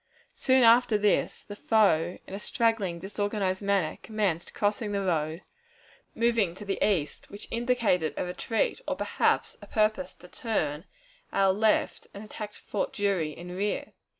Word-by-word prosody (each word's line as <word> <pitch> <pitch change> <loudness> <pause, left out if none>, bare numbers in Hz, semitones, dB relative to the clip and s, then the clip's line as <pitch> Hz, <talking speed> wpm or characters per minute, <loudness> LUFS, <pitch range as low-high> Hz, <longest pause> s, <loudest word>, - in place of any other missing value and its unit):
Soon 260 -1 +3
after 230 -1 +6
this, 210 -1 +1
the 205 - -9
foe 185 -6 +2
in - - -10
a 195 - -4
straggling, 215 -6 0
disorganized 200 0 -2
manner, 200 -5 0
commenced 200 -6 -1
crossing 205 0 0
the 200 -1 0
road, 160 -1 -1 0.7
moving 230 -7 +2
to 210 - -9
the 195 -1 -1
east, 170 -8 0
which 205 - -8
indicated 230 - +1
a - - -1
retreat, 220 - -1
or - - 0
perhaps - - 0
a - - -11
purpose 215 +5 0
to 180 - -15
turn 165 - -2 0.5
our 195 -1 +3
left 215 +2 +1
and 200 - -7
attack 210 -1 -7
Fort 205 - -3
Drury 195 -6 0
in 175 +4 -8
rear. 205 +2 -2
205 Hz, 150 wpm, -28 LUFS, 180-215 Hz, 0.7 s, after